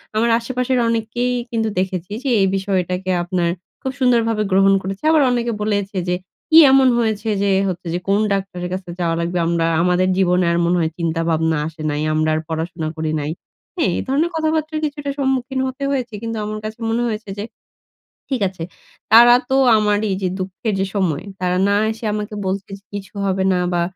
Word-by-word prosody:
আমার 230 +2 +2
আশেপাশের 250 +1 -1
অনেকেই 230 +2 -1 0.2
কিন্তু 225 -1 0
দেখেছি 185 0 -3
যে, 270 - -1
এই 195 - +4
বিষয়টাকে 185 -1 -1
আপনার 175 -1 0 0.3
খুব 265 - -2
সুন্দরভাবে 230 -4 +2
গ্রহণ 195 +1 +5
করেছে। 195 +4 -6
আবার 315 - +5
অনেকে 240 -1 0
বলেছে 205 -2 -1
যে, 180 - +1 0.3
"কি 320 - +6
এমন 265 -1 +6
হয়েছে 220 -2 0
যে 200 - +2 0.2
হচ্ছে 180 -1 -4
যে 175 - -1
কোন 200 +1 +3
ডাক্তারের 190 -2 -3
কাছে 185 -1 -5
যাওয়া 165 -1 0
লাগবে। 170 +1 -2
আমরা 170 -1 +1 0.2
আমাদের 180 +1 +2
জীবনে 180 -1 +3
আর 170 - +1
মনে 175 +1 +2
হয় 160 -1 0
চিন্তা 165 -1 -1
ভাবনা 160 0 +1
আসে 160 -1 -10
নাই। 150 0 -2
আমরা 155 0 +1
আর - - 0
পড়াশোনা 160 0 -3
করি 155 -1 -2
নাই।" 150 +1 -3 0.4
হ্যাঁ, 325 - +1
এ - - -1
ধরনের 300 +6 +1
কথাবার্তার 315 -1 -1
কিছুটা 290 -1 -4
সম্মুখীন 265 -1 0
হতে 260 +2 -6
হয়েছে, 250 -4 -2
কিন্তু 230 -1 -4
আমার 215 0 -4
কাছে 215 +2 -6
মনে 230 +1 0
হয়েছে 215 -2 -4
যে, 205 - -3 0.9
ঠিক 265 -4 -1
আছে। 185 -3 -9 0.5
তারা 240 +2 +9 0.2
তো 265 - +3 0.2
আমারই 210 0 +1
যে 185 - +1
দুঃখের 190 +3 -3
যে 195 - +1
সময় 185 -4 0 0.2
তারা 180 0 0
না 200 - +3
এসে, 225 +1 -7
আমাকে 210 0 -4
বলছে 190 +1 -3
যে, - - -29
কিছু 195 -2 -7
হবে 190 -1 0
না, 180 - +1
বা 175 -1 +1
200 Hz, 190 wpm, -20 LUFS, 180-235 Hz, 0.9 s, তারা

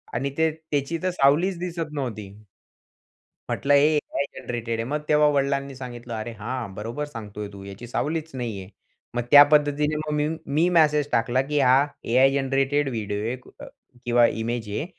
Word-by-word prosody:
आणि 135 +4 -1
ते 160 0 +3
त्याची 155 0 -3
तर 185 - +2
सावलीच 170 +4 +3
दिसत 170 -3 -4
नव्हती. 115 -8 -4 1.2
म्हटलं 145 +1 +1
हे 150 +2 +5
AI 140 -1 -1
जनरेटेड 115 -1 -4
आहे. 115 - 0
मग 150 +1 -1
तेव्हा 150 0 +5
वडिलांनी 140 0 0
सांगितलं, 120 -2 -8
"अरे 110 +1 -4
हां, 115 -2 -4
बरोबर 115 +8 -4
सांगतोय 105 -6 -7
तू, 100 -1 -10
याची 100 +5 -9
सावलीच 160 +5 -2
नाहीये." 110 -7 -5 0.5
मग 120 - +1
त्या 145 0 +11
पद्धतीने 150 0 +2
मग 155 0 -3
मी, 150 0 +1 0.2
मी 155 +5 +2
मॅसेज 150 -2 +3
टाकला, 120 +2 +2
की 145 +2 -1
हा 135 +2 +5 0.2
AI 130 +3 +4
जनरेटेड 135 +1 +1
व्हिडिओ 105 -4 -3
आहे 125 - -2 0.2
अ, - - -8 0.4
किंवा 120 0 +5 0.2
इमेज 115 -2 -3
आहे. 105 +10 -3
135 Hz, 170 wpm, -24 LUFS, 120-150 Hz, 1.2 s, त्या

